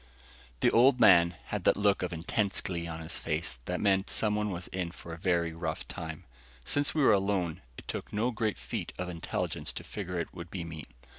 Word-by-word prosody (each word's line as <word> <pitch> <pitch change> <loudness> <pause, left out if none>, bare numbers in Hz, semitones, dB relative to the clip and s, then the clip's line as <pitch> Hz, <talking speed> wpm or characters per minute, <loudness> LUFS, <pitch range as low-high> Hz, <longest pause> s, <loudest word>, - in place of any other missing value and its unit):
The - - +5
Old 125 +2 +6
Man 85 -6 +7
had - - -2
that - - +5
look 100 -1 +3
of 90 -1 -2
intense 95 +4 0
glee 85 -2 -3
on 80 -1 -5
his 80 +1 -3
face 75 -5 -2
that 90 - -2
meant 95 -1 +2
someone 105 -1 +1
was 90 -2 -4
in 90 -2 -2
for 85 0 -9
a - - -6
very 85 -2 +1
rough 80 -1 -4
time. 80 +3 -6 0.4
Since 145 - +1
we 150 - +3
were 110 - +7
alone, 95 -4 0 0.2
it - - -11
took - - -5
no 115 +4 +1
great 110 -2 -1
feat - - -4
of 90 0 -3
intelligence 85 -2 -2
to - - -6
figure 90 -4 -4
it 85 - -4
would 85 -1 -8
be 90 -1 -4
me. 80 -2 -7
90 Hz, 210 wpm, -30 LUFS, 85-105 Hz, 0.4 s, Man